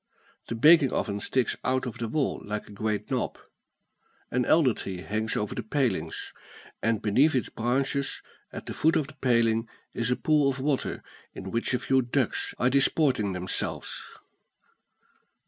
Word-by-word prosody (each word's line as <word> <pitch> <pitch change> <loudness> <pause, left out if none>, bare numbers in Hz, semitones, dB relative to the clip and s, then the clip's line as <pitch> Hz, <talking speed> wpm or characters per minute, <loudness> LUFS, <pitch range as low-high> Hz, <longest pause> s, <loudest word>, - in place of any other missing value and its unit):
The 115 - -3
baking 150 +3 +6
oven 100 -2 -1
sticks 125 +3 0
out 130 0 0
of 125 - -6
the 115 - -2
wall 140 +5 -1
like 105 +1 -4
a - - -13
great 105 0 -3
knob. - - -1 0.9
An 125 0 +1
elder 150 -7 +4
tree 95 -3 -6
hangs 110 +3 -2
over 105 - -2
the - - -3
palings; 120 -2 -2 0.5
and 115 -1 0
beneath 135 +9 +3
its 125 - 0
branches, 135 +4 -1 0.3
at - - -8
the - - -5
foot 160 +1 +2
of 150 - +2
the 155 - -12
paling, 115 -3 +2 0.2
is 120 +1 -1
a 125 - +2
pool 150 -1 +2
of 135 0 -3
water, 135 0 -1 0.3
in - - -7
which 115 +2 +1
a - - +2
few 130 +1 +2
ducks 125 +1 -1
are 125 +1 +2
disporting 135 -6 +3
themselves. 90 0 -2
125 Hz, 165 wpm, -27 LUFS, 110-135 Hz, 0.9 s, baking